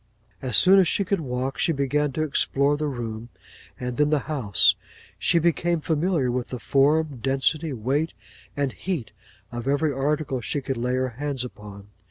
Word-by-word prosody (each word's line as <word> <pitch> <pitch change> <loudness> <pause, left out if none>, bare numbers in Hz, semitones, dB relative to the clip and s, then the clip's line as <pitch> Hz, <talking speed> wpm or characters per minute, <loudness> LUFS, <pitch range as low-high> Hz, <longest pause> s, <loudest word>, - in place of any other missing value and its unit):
As 125 -4 +2
soon 190 +1 +7
as 185 - +4
she 200 - +1
could 195 +1 0
walk, 130 -2 -3
she - - +2
began 145 0 0
to 155 - -1
explore 140 -1 +2
the 150 +1 -2
room, 120 -3 -5 0.5
and 125 -1 -4
then 150 0 +3
the 150 -2 +2
house; 130 - +3 0.5
she 170 - +2
became 170 +1 +1
familiar 155 -4 0
with 125 -2 -2
the 125 - -5
form, 140 +2 +2
density, 135 +4 0
weight, 135 +7 -1 0.4
and 140 -2 0
heat, 175 - -4 0.4
of 120 +1 -5
every 145 +2 +1
article 135 -1 -1
she 130 +6 -1
could 135 0 -3
lay 125 +2 -1
her 130 0 0
hands 135 +1 -3
upon. 105 -4 -11
140 Hz, 175 wpm, -24 LUFS, 125-155 Hz, 0.5 s, soon